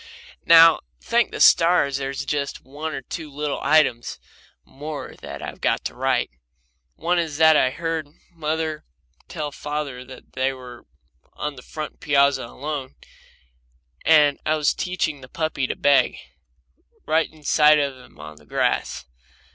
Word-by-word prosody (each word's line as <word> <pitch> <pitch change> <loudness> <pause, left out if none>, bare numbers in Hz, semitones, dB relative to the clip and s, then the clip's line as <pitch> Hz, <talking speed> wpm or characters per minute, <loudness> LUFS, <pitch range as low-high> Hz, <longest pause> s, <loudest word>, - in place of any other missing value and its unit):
Now, 165 -1 +8 0.2
thank 235 -2 +1
the - - -7
stars, 165 -5 +5
there's 135 0 -4
just 140 -1 -3
one 150 +3 -5
or 135 - -6
two 160 -2 -7
little 145 0 -4
items 145 -6 +2 0.5
more 150 +2 -7
that - - -8
I've - - -8
got - - 0
to - - -3
write. - - 0 0.6
One 175 +1 0
is 160 -4 -3
what 160 0 +6
I 130 - +4
heard 165 +1 -3 0.2
mother 155 -1 -3 0.4
tell 150 -3 -5
father 145 -3 -5
when 130 0 -13
they 130 +1 0
were 125 -2 -12 0.5
on 150 0 -4
the 125 - -11
front 155 +3 -7
piazza 140 -2 +2
alone, 140 0 -6 1.1
and 150 -3 +5
I 155 - +1
was 150 -2 +1
teaching 175 -6 -2
the 130 - -13
puppy 155 -4 -2
to - - -3
beg, 140 -1 +3 0.9
right 160 +1 +1
in 155 -1 -19
sight 150 +1 +5
of 140 -2 -1
them 125 -11 -18
on 75 0 -10
the 75 - -19
grass. - - -1
150 Hz, 150 wpm, -23 LUFS, 135-160 Hz, 1.1 s, Now